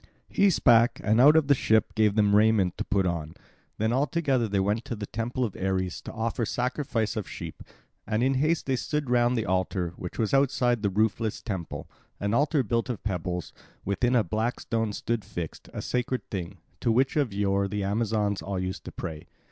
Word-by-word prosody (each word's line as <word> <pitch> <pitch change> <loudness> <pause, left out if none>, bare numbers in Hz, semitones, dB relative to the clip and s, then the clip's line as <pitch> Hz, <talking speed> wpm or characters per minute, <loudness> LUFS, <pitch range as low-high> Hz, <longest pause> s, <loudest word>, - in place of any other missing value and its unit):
He 200 0 +4
spake, 120 -8 +4
and 110 +3 +4
out 150 +4 +8
of 160 -2 +5
the 140 - +5
ship 110 -4 +2
gave 105 -2 +2
them 105 -2 +4
raiment 105 -4 +4
to - - 0
put 100 -1 +1
on. 85 -3 -3 0.4
Then 110 +2 +1
all 135 +4 +2
together 135 -6 +1
they 100 -1 0
went 105 +4 0
to 120 - -4
the 105 -1 -5
temple 120 +4 -2
of 105 - -5
Ares 95 -1 -2
to - - -8
offer 115 +1 -2
sacrifice 120 -1 -1
of 105 -3 -4
sheep; - - -7 0.5
and 110 +2 +1
in 135 +1 +3
haste 155 +5 +1
they 130 -1 0
stood 150 -1 -2
round 120 0 +3
the 110 - 0
altar, 95 -1 -1
which 90 - -7
was 110 +1 0
outside 125 -4 +2
the 100 - +1
roofless 110 +2 0
temple, 95 -6 -5 0.3
an 100 +1 -1
altar 145 +2 +2
built 115 +3 -1
of 120 - -4
pebbles; 90 -4 -3 0.3
within 120 +6 +1
a 115 - +4
black 110 +6 -1
stone 115 -2 -1
stood 115 +1 -2
fixed, 85 -5 -7
a - - -5
sacred 125 +1 -2
thing, 95 -1 -4 0.2
to 115 - +1
which 130 +4 +2
of 145 -7 +1
yore 100 0 +1
the 105 0 -3
Amazons 105 0 0
all 100 -1 -4
used 95 +1 -3
to - - -6
pray. 80 -1 -7
110 Hz, 205 wpm, -27 LUFS, 100-125 Hz, 0.5 s, out